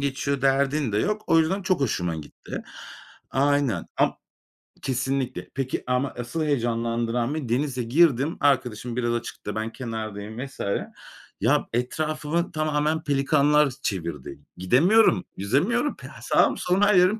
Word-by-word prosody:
geçiyor 140 0 -1
derdin 135 -2 +2
de 105 - +1
yok. 210 - 0
O 165 - +5
yüzden, 190 +5 +1
çok 185 -5 +1
hoşuma 90 -10 0
gitti. 75 -2 -8 0.7
Aynen 140 -7 +1
am - - +2 0.7
kesinlikle. 130 0 -2
Peki 135 -1 -2
ama 125 +2 0
asıl 120 +7 -3
heyecanlandıran 120 -1 0
beni, 135 -7 -4
denize 130 0 0
girdim. 140 +3 +3
Arkadaşım 125 -4 +1
biraz 120 -1 0
açıkta 115 -3 -5
ben 110 +1 -2
kenardayım 110 0 -5
vs. 135 - -14 0.8
ya, - - +2
etrafımı 155 +6 -1
tamamen 155 0 0
pelikanlar 145 +1 +3
çevirdi. 85 - -3
G 90 - -14
gidemiyorum. 145 - +4
Yüzemiyorum. 180 - +1
Pe - - -11
ha - - -13
sağım, - - +3
solum, 180 +3 +1
her 205 0 +5
yerim 185 +5 +4
135 Hz, 135 wpm, -25 LUFS, 115-155 Hz, 0.8 s, O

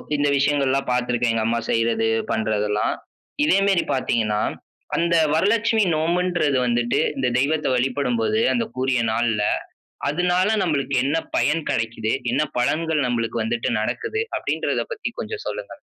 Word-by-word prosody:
இந்த 145 0 +1
விஷயங்கள்லாம் 140 -1 +1
பாத்துருக்கேன். 125 -1 +1
எங்க 115 -1 0
அம்மா 115 +1 +1
செய்றது, 115 -1 +1 0.2
பண்றதுல்லாம். 105 -1 0 0.5
இதே 300 - +4
மேரி 195 -3 +3
பாத்தீங்கன்னா, 110 -5 0 0.5
அந்த 170 0 +2 0.2
வரலட்சுமி 220 +6 +2
நோம்புன்றது 170 -2 +1
வந்துட்டு, 120 0 +1 0.2
இந்த 135 -1 +1
தெய்வத்த 150 +4 +1
வழிபடும்போது 125 -4 0
அந்தக்குரிய 130 0 0
நாள்ல, 110 -2 +1 0.7
அதனால 180 +6 +1
நம்மளுக்கு 140 -5 0
என்ன 145 +4 +1 0.2
பயன் 155 +2 +1
கடைக்கிது? 110 0 -1 0.2
என்ன 140 +4 +2 0.2
பலன்கள் 155 +3 +1
நம்மளுக்கு 115 -1 -1
வந்துட்டு 115 +1 -1
நடக்குது? 125 - -2 0.2
அப்டீன்றத - - -1
பத்தி 440 - -4
கொஞ்சம் 435 -1 -5
சொல்லுங்க. - - -5
130 Hz, 125 wpm, -22 LUFS, 115-160 Hz, 0.7 s, இதே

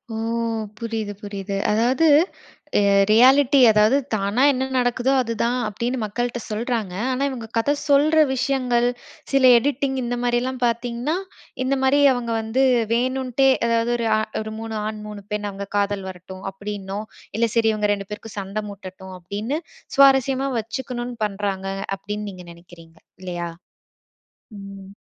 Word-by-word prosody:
ஓ! - - -3 0.6
புரியுது, 225 -3 -3
புரியுது. 200 -1 -5 0.2
அதாவது 245 +8 +2 1.0
ரியாலிட்டி 265 +5 +6
அதாவது 215 +5 +4 0.2
தானா 200 +4 0
என்ன 260 -1 -1
நடக்குதோ 250 +1 +1
அதுதான் 235 +1 -1
அப்டின்னு 235 +5 -2
மக்கள்ட்ட 240 +3 -2
சொல்றாங்க. 220 -3 -2 0.2
ஆனா, 260 +2 -1
இவங்க 240 -4 -6
கதை 285 +6 +2 0.2
சொல்ற 305 +3 +5
விஷயங்கள், 250 -2 +1 0.4
சில 265 -2 +6
எடிட்டிங் 270 +1 0
இந்த 240 +1 -2
மாரிலாம் 245 +1 -1
பார்த்தீங்கன்னா, 240 +5 -1 0.5
இந்த 270 +1 +1
மாரி 270 +2 +4
அவங்க 235 -2 -3
வந்து 230 +5 0 0.3
வேணுன்ட்டே, 260 +2 +1 0.2
எதாவது 230 +1 +1
ஒரு 230 -1 -1 0.3
ஒரு 215 0 -6
3 225 0 -5
ஆண் 215 0 -5
3 210 -1 -8
பெண் 210 0 -2
அவங்க 200 0 -7
காதல் 200 -1 0
வரட்டும் 185 +1 -10
அப்டினும். 200 +1 -6 0.3
இல்ல 230 0 +3
சரி 225 -1 +4
இவங்க 210 -1 0
2 200 -1 -5
பேருக்கும் 210 +1 -8
சண்டை 200 +2 -4
மூட்டட்டும். 190 -1 -10
அப்டின்னு, 210 - -3 0.4
சுவாரஸ்யமா 270 0 +4
வச்சுக்கணும்னு 240 +2 -5
பண்றாங்க. 195 -1 -3 0.3
அப்டின்னு 210 +1 -5
நீங்க 180 -2 -11
நினைக்கிறீங்க, 170 -1 -17 0.2
இல்லையா? 175 -2 -4 1.1
ம். 195 0 -10
230 Hz, 130 wpm, -22 LUFS, 200-255 Hz, 1.1 s, ரியாலிட்டி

